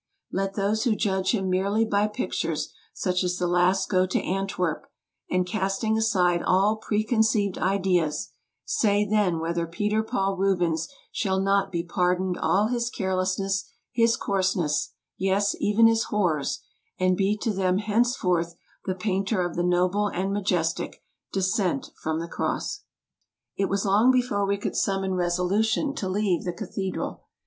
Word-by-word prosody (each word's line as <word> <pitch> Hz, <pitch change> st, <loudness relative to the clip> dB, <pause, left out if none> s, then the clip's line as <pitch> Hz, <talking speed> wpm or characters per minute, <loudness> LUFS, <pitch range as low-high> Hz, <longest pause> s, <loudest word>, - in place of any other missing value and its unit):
Let 195 Hz, 0 st, -2 dB
those 210 Hz, +2 st, 0 dB
who 235 Hz, -4 st, +2 dB
judge 190 Hz, -2 st, 0 dB
him 195 Hz, -4 st, 0 dB
merely 200 Hz, +4 st, +1 dB
by 205 Hz, -1 st, +2 dB
pictures 215 Hz, +4 st, -3 dB, 0.2 s
such 180 Hz, -1 st, -1 dB
as 180 Hz, 0 st, -1 dB
the 180 Hz, -, -1 dB
last 180 Hz, +2 st, +2 dB
go 185 Hz, -1 st, +2 dB
to 185 Hz, -, 0 dB
Antwerp, 185 Hz, -4 st, -2 dB, 0.4 s
and, 180 Hz, 0 st, +1 dB
casting 195 Hz, +3 st, -1 dB
aside 185 Hz, -6 st, +2 dB
all 200 Hz, +4 st, +3 dB
preconceived 215 Hz, -2 st, +1 dB
ideas, 185 Hz, -5 st, 0 dB, 0.3 s
say 210 Hz, -, +2 dB
then 205 Hz, -5 st, +2 dB
whether 170 Hz, +1 st, -2 dB
Peter 210 Hz, +6 st, 0 dB
Paul 195 Hz, -4 st, -1 dB
Rubens 175 Hz, -4 st, +1 dB, 0.2 s
shall 190 Hz, -3 st, 0 dB
not 195 Hz, 0 st, +1 dB
be 170 Hz, -2 st, -1 dB
pardoned 180 Hz, +1 st, 0 dB
all 200 Hz, +3 st, +2 dB
his 235 Hz, +1 st, -1 dB
carelessness, 190 Hz, -1 st, -1 dB, 0.2 s
his 230 Hz, 0 st, +3 dB
coarseness 185 Hz, -6 st, 0 dB
— -, -, -64 dB
yes, 195 Hz, +2 st, +1 dB
even 210 Hz, +2 st, +4 dB
his 225 Hz, 0 st, +4 dB
horrors 170 Hz, -9 st, 0 dB, 0.2 s
— -, -, -44 dB
and 185 Hz, 0 st, +3 dB
be 200 Hz, +2 st, +1 dB
to 215 Hz, 0 st, -1 dB
them 185 Hz, -1 st, +1 dB
henceforth 205 Hz, -6 st, +1 dB, 0.3 s
the 185 Hz, -, -1 dB
painter 190 Hz, 0 st, 0 dB
of 175 Hz, -, -4 dB
the 175 Hz, -, 0 dB
noble 180 Hz, +3 st, +2 dB
and 195 Hz, 0 st, -2 dB
majestic 180 Hz, -5 st, -1 dB
' -, -, -52 dB
' -, -, -60 dB
Descent 190 Hz, -, 0 dB
from 160 Hz, 0 st, -1 dB
the 170 Hz, -, -4 dB
Cross. 410 Hz, -, -3 dB, 0.2 s
' -, -, -52 dB
' -, -, -64 dB
It 195 Hz, -, +1 dB
was 200 Hz, +2 st, 0 dB
long 205 Hz, +5 st, +4 dB
before 245 Hz, -6 st, +2 dB
we 200 Hz, 0 st, +1 dB
could 200 Hz, -, -4 dB
summon 195 Hz, -1 st, 0 dB
resolution 185 Hz, -, +1 dB
to 195 Hz, -9 st, -3 dB
leave 195 Hz, -2 st, 0 dB
the 175 Hz, -, -3 dB
cathedral. 190 Hz, +2 st, -4 dB
195 Hz, 160 wpm, -26 LUFS, 180-210 Hz, 0.4 s, even